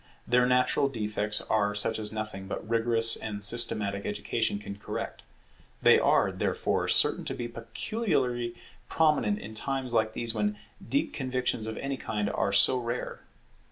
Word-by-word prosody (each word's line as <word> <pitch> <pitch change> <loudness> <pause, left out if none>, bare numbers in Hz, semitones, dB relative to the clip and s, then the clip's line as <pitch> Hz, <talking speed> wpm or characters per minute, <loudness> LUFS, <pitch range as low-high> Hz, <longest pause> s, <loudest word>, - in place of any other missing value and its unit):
Their 125 +1 +3
natural 125 +2 +2
defects 105 -3 0
are 105 -1 0
such 105 +2 +1
as 105 -1 +1
nothing 110 -3 -5
but 100 - -6
rigorous 115 0 +3
and 105 -2 -5
systematic 105 -2 +2
education 105 +1 -1
can 100 0 -8
correct; - - -5 0.6
they - - +6
are, - - +3
therefore, - - -1
certain - - +3
to - - -3
be 120 - -4
peculiarly 120 - -2 0.3
prominent 150 -10 +2
in 105 +1 -9
times 130 +2 -3
like 110 -1 +1
these 115 -1 -1
when 105 -1 -1 0.3
deep - - -1
convictions 125 -4 -2
of 110 - -5
any 135 0 -3
kind 105 -4 -2
are - - 0
so 115 +6 +5
rare. 120 +1 -4
110 Hz, 155 wpm, -28 LUFS, 105-125 Hz, 0.6 s, they